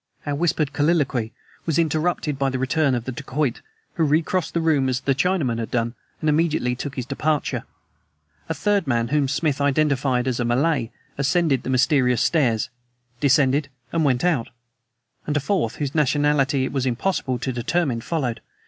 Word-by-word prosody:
Our 145 - -1
whispered 155 -2 0
colloquy 145 -7 +1 0.4
was 160 - +1
interrupted 155 -2 0
by 135 -1 +2
the 130 - -2
return 135 +1 +1
of 120 -1 -3
the 130 - -3
dacoit, 140 0 -2 0.3
who 165 - 0
recrossed 160 +4 +1
the - - +3
room 150 -5 +2
as 130 0 -1
the 135 - +1
Chinaman 145 -6 0
had 115 - -3
done, 115 -1 -1 0.3
and 155 - -1
immediately 150 -5 +1
took 135 +2 -6
his 125 - -3
departure. 150 +3 -1 0.8
A 160 - -1
third 205 -3 +1
man, 115 -2 +1
whom 145 0 +2
Smith 145 +1 0
identified 140 -3 +1
as 125 -2 -1
a - - +1
Malay, 125 +1 +1 0.3
ascended 140 -2 +2
the - - -6
mysterious 130 -2 +3
stairs, 130 -8 +1 0.5
descended, 140 +1 +3 0.2
and 165 -1 +2
went 130 -2 +2
out; 160 -10 +1 0.8
and 150 -1 +1
a - - +3
fourth, 150 - -1
whose 145 -2 -3
nationality 145 -2 +2
it - - -4
was 135 -2 0
impossible 130 0 -1
to 130 +1 -3
determine, 125 0 0
followed. 125 -6 -2
140 Hz, 170 wpm, -23 LUFS, 130-155 Hz, 0.8 s, the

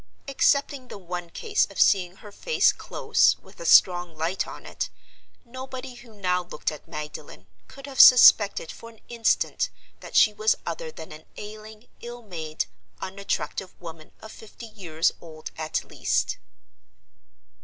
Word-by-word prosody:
Excepting 275 -1 +1
the - - -9
one 175 -2 -6
case 430 - 0
of - - -10
seeing 180 -2 +3
her 205 +1 -13
face 475 - +2
close, - - +1
with - - -20
a - - -5
strong 175 -3 +5
light 165 +4 -2
on - - -10
it, - - -4 0.6
nobody 260 +1 -8
who 240 -2 -15
now 180 -3 0
looked 175 - -4
at 155 - -11
Magdalen 150 -9 -8 0.2
could 275 0 -12
have 275 -2 -8
suspected 210 -8 +7
for 230 - -12
an 225 -1 -20
instant 235 -1 0 0.3
that - - -11
she 215 - +6
was 215 +1 +1
other - - -5
than 315 - -11
an 155 +1 -12
ailing, 215 +2 -10
ill 240 0 -9
made, 160 -6 -4 0.3
unattractive 190 -2 -4
woman 165 -2 -11
of 220 - -10
fifty 220 +2 -12
years 175 -7 -1
old 155 -2 -10
at 155 0 -3
least. - - -1
205 Hz, 150 wpm, -25 LUFS, 170-240 Hz, 0.6 s, suspected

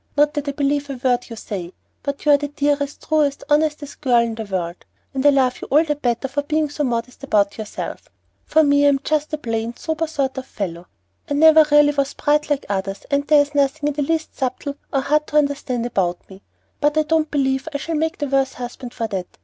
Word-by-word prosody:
"Not 295 +1 +4
that 290 -1 -3
I - - +1
believe 285 0 0
a 275 - -3
word 245 -1 0
you 230 - -7
say; 185 -5 -6 0.3
but 280 +1 -5
you 300 - +5
are 285 - +7
the 290 0 -3
dearest, 285 0 -1
truest, 295 -3 +1
honestest 300 -1 0
girl 255 -4 +3
in 235 -1 +2
the 220 0 -5
world, 180 -3 -4 0.3
and 265 -1 -1
I 290 - +7
love 265 -3 +2
you - - -6
all 300 +4 +5
the 300 -2 -1
better 245 -2 -1
for 285 +2 -2
being 300 0 -1
so 295 - -2
modest 245 0 -3
about 205 -5 +1
yourself. 215 -1 -6 0.3
For 315 0 +3
me, 285 0 +4
I'm 280 -1 +3
just 305 0 0
a 305 - -1
plain, 230 -3 -3
sober 320 0 -2
sort 275 -4 -2
of 260 - -10
fellow. 175 -4 -5 0.4
I 290 - 0
never 315 +1 +7 0.3
was 280 -1 -1
bright 300 +1 +1
like 290 -1 +1
the 205 - -3
others, 195 0 -4
and 285 0 +1
there's 290 -1 +4
nothing 290 +1 +1
in - - -3
the 290 - -2
least 315 +2 -1
'subtle' 275 +2 -3
or 275 - +1
hard 300 +2 +1
to 300 - 0
understand 280 -4 0
about 180 -7 -1
me; 190 0 -14 0.4
but 295 +1 +1
I 310 - +4
don't 315 0 +1
believe 265 -1 0
I 285 - -2
shall 325 +3 -4
make 320 +2 -1
the 290 - -2
worse 270 -1 +1
husband 245 0 -8
for 230 - -2
that. 190 -4 -5
280 Hz, 230 wpm, -21 LUFS, 245-295 Hz, 0.4 s, are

